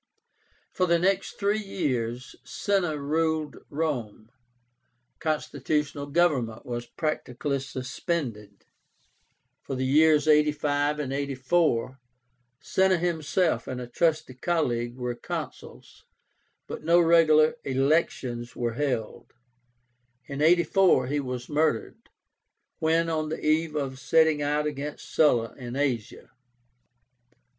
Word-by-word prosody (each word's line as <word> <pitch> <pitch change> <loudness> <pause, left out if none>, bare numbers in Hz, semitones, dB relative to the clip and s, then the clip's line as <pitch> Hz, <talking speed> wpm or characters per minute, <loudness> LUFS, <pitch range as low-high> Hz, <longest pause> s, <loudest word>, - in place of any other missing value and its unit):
For 185 - 0
the 170 0 +4
next 190 +3 0
three 205 +2 +1
years 125 - -3
Cinna 175 +4 -1
ruled 155 +1 -1
Rome. 125 -8 -3 0.9
Constitutional 150 -1 -2
government 140 -8 +1
was 120 -1 -5
practically 145 -3 -2
suspended. 130 - -5 1.0
For 135 - -5
the 130 0 -1
years 150 +2 +4
85 150 -1 +2
and 140 -3 -3
84 135 -1 0 0.6
Cinna 190 +4 +2
himself 165 -5 0
and 130 -1 -4
a 125 - -5
trusty 155 +2 0
colleague 125 -5 -1
were 125 -1 -3
Consuls, - - -8 0.6
but - - -7
no 170 +2 +5
regular 160 -2 +5
elections 130 -3 0
were 120 -1 -2
held. 125 -4 -3 0.9
In 140 0 -5
84, 170 -2 +4
he 145 +1 0
was 125 -3 -5
murdered, 150 -6 -1 0.7
when 165 +1 +2
on 155 -2 -1
the 160 - -5
eve 155 0 +1
of 135 -3 -3
setting 160 0 +3
out 150 +1 0
against 150 0 -5
Sulla 120 -7 +3
in 120 -1 -7
Asia. 130 -6 -2
145 Hz, 105 wpm, -26 LUFS, 125-160 Hz, 1.0 s, no